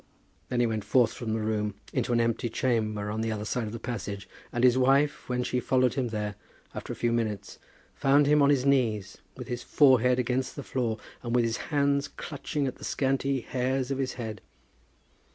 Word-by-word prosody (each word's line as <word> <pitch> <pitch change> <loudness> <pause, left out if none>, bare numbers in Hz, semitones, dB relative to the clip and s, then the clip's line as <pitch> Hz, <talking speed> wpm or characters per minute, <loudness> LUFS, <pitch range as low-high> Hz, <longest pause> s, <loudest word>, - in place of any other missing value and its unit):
Then 125 - 0
he - - +4
went 110 -2 -1
forth 120 +3 +3
from 110 -3 -4
the 110 - 0
room 105 -1 -1 0.2
into - - 0
an 120 - +3
empty 115 +1 0
chamber 110 -4 0
on 110 +1 -2
the 110 0 -1
other 105 -1 -3
side 120 +1 -1
of - - -5
the 115 - -5
passage; 105 -4 -5 0.2
and 120 - -1
his 125 -1 +6
wife, 135 +3 +2
when 125 0 0
she 125 - 0
followed 130 0 +2
him 130 -3 -1
there 105 -2 -3 0.4
after - - -6
a - - -4
few 120 - 0
minutes, 110 -4 -2 0.3
found 140 +2 +4
him 150 +1 +4
on 140 - +5
his 140 -2 +3
knees, 110 -8 +1 0.2
with 125 -2 -7
his 120 0 -3
forehead 125 -4 +4
against 125 +1 -1
the 140 - -6
floor, 120 -5 -1 0.2
and 120 -1 -2
with 120 -1 +4
his 115 0 -1
hands 140 -1 +2
clutching 145 0 -4
at 130 - -3
the - - -13
scanty 135 -1 0
hairs 130 +2 -1
of 135 - -1
his 130 -1 -1
head. 110 -4 -6
125 Hz, 205 wpm, -28 LUFS, 110-135 Hz, 0.4 s, his